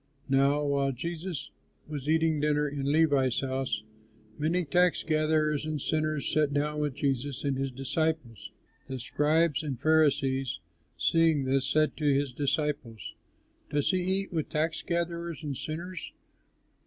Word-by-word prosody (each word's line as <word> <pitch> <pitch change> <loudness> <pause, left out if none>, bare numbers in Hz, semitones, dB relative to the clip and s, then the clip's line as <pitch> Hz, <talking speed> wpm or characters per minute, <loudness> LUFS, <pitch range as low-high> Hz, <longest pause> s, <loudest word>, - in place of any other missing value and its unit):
Now 140 +2 +3
while 140 -1 +1
Jesus 165 +3 -5 0.4
was 150 -1 -5
eating 160 -1 +3
dinner 150 0 +2
in 140 -1 -2
Levi's 145 -5 +3
house, 130 -4 -2 0.5
many 165 +6 0
tax 180 +3 +2
gatherers 155 -1 +1
and 155 -1 -2
sinners 155 0 -1
sat 150 -2 +2
down 150 +1 0
with 145 -3 -1
Jesus 135 -1 -1
and 140 -2 0
his 135 +1 -1
disciples. 135 - -2 0.4
The 130 - -4
scribes 150 +4 +1
and 140 -6 -4
Pharisees, 135 - +2 0.4
seeing 165 -4 +3
this, 135 0 +1
said 155 0 +2
to 150 -2 +2
his 140 -1 +1
disciples, 140 -5 -2 0.6
"Does 145 +3 +1
he 185 - +1
eat 190 +1 -1
with 160 -3 -1
tax 160 +1 -1
gatherers 170 -2 -3
and 145 -2 -3
sinners?" 170 +6 -5
150 Hz, 140 wpm, -29 LUFS, 135-160 Hz, 0.6 s, Now